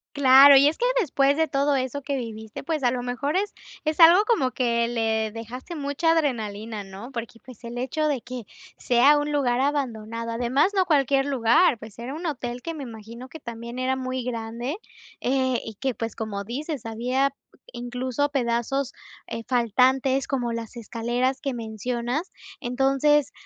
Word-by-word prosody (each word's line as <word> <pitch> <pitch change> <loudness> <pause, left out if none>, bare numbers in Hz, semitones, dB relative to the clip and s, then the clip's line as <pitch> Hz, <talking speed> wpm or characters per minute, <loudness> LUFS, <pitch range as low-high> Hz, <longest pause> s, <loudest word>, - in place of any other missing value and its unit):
Claro, 275 0 +8
y 275 +2 +6
es 310 - +1
que 485 - +1
después 280 - +2
de 320 0 +2
todo 280 0 +1
eso 260 +1 -2
que 280 0 -2
viviste, 220 -3 -7
pues, 310 -2 -2
a 245 - +4
lo 245 -1 -3
mejor 250 +5 -2
es 405 +2 0 0.3
es 310 +1 -1
algo 340 +4 +8
como 430 - +2
que 235 -2 +1
le 220 -2 0
dejaste 235 +9 -8
mucha 285 +2 0
adrenalina, 220 -8 -1
¿no?, 195 +6 -10
porque, 235 -2 -6
pues, 250 -2 -15
el 235 +1 -7
hecho 265 +5 -1
de 280 -5 0
que 250 -2 -7 0.3
sea 260 +5 +4
un 295 0 -2
lugar 255 -4 +1
abandonado, 230 -5 -2
además, 245 +9 +2
no 375 -2 +3
cualquier 275 -3 +2
lugar, 255 +1 +3
pues, 220 0 -12
era 250 +4 -5
un 335 +3 -6
hotel 245 -5 -4
que 330 - -4
me 310 - -7
imagino 230 +1 -10
que 320 - -10
también 235 -1 -8
era 255 +1 0
muy 255 -1 -3
grande, 235 - -4 0.4
eh, 260 -1 +1
y 220 - -8
que, 260 +5 -2
pues, 225 +1 -5
como 205 -3 -4
dices, 275 +4 -5
había 250 +5 0 0.4
incluso 245 +3 -2
pedazos, 260 0 -1 0.3
eh, 230 - -5
faltantes, 260 +3 +2
como 245 -4 -1
las 230 +1 -6
escaleras 240 +3 -1
que 275 -2 -2
mencionas. 240 - -3 0.3
Entonces, 270 +3 +2
255 Hz, 170 wpm, -25 LUFS, 235-280 Hz, 0.4 s, Claro